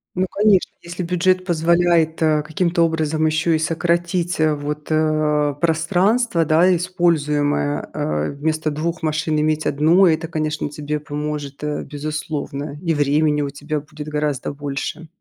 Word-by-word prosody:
Ну, 185 +1 0
конечно, 205 -2 +3
если 170 +1 -6
бюджет 180 +1 +1
позволяет, 170 -1 +2
а, 155 -1 +3
каким-то 170 +2 +1
образом 160 -1 0
ещё 155 +2 +1
и 160 - +3
сократить, 170 +2 0
а, 155 -1 +3
вот, 150 +1 -5
а, 155 -1 +2
пространство, 175 - +1
да, 170 +4 +4
используемое, 150 - 0
а, 75 0 -1
вместо 155 +2 -1
2 165 +4 -3
машин 155 -1 0
иметь 155 0 0
1, 160 +7 +4
это, 165 -1 +2
конечно, 155 -2 -2
тебе 150 +1 -4
поможет, 150 -1 -5
а, 150 0 -2
безусловно. 150 -1 -5
И 165 - +1
времени 150 +1 +2
у 140 - -2
тебя 145 +2 -4
будет 150 +1 -10
гораздо 150 -3 -2
больше. 145 +3 -5
155 Hz, 140 wpm, -20 LUFS, 150-170 Hz, -, да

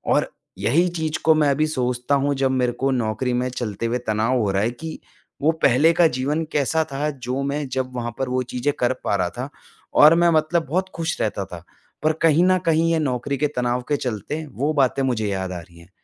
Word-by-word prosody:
और - - 0 0.3
यही 170 +8 +2
चीज़ 160 -1 -2
को 160 - +6
मैं 150 -2 +3
अभी 155 +3 +1
सोचता 125 -1 0
हूँ, 140 +1 +1
जब 135 -1 +1
मेरे 125 -2 +1
को 135 +1 +1
नौकरी 125 0 -1
में 125 +1 0
चलते 115 -3 -4
हुए 115 +2 0
तनाव 110 +4 +1
हो 105 -3 +1
रहा 95 +1 +1
है 115 - 0
कि 160 +5 -8 0.4
वो 155 +3 +4
पहले 145 +6 +5
का 170 0 +5
जीवन 150 +4 -1
कैसा 155 +3 +1
था, 150 +2 -1
जो 130 -1 -4
मैं 140 0 -2
जब 130 -1 -2
वहाँ 120 -1 -3
पर 135 -1 -1
वो 130 0 0
चीज़ें 140 +4 0
कर 125 +1 +2
पा - - +1
रहा 90 -2 0
था 130 +3 -4 0.4
और 155 +3 +7
मैं 170 0 +4
मतलब 160 +1 +1
बहुत 185 +5 -1
खुश 165 -1 -2
रहता 100 -2 -1
था। 85 -2 -10 0.4
पर 155 +1 +3
कहीं 165 +1 +4
न 185 0 +4
कहीं, 165 0 +3
ये - - +2
नौकरी 135 -1 -1
के 150 - +1
तनाव 125 0 0
के 145 - +3
चलते 130 +6 -4
वो 145 +5 0
बातें 135 -1 +2
मुझे 115 -5 0
याद 95 -2 -2
आ 90 - -5
रही 85 0 -15
हैं 85 +2 -17
135 Hz, 230 wpm, -22 LUFS, 120-155 Hz, 0.4 s, और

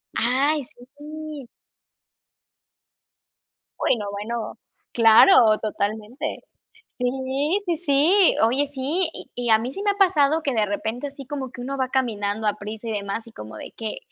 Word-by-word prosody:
Ay, 275 +5 +2 0.3
sí. 305 -3 -8 2.3
Uy 240 - +2
no, 210 - -5
bueno, 220 +3 -5 0.4
claro, 225 - +7
totalmente. 215 +3 -3 0.6
Sí, 265 +8 -1
sí, 340 - 0
sí, 335 +5 +4
oye, 260 +6 +3
sí, 290 +6 -1
y - - -10
y 245 -1 -3
a 220 - +7
mí 245 +4 -4
sí 395 - -6
me 415 - +2
ha 400 - 0
pasado, 320 -6 +3
que 280 - -1
de 220 -3 +1
repente 220 +6 -3
así 275 -1 -11
como 265 -2 -5
que 245 0 -9
uno 275 +2 -4
va 260 -1 0
caminando 220 -5 -1
a 210 - +2
prisa. 215 +2 -7
y 225 - -2
demás, 205 +2 -4
y 230 - -14
como 110 0 -10
de - - -9
que: 220 -2 -5
255 Hz, 155 wpm, -23 LUFS, 220-290 Hz, 2.3 s, claro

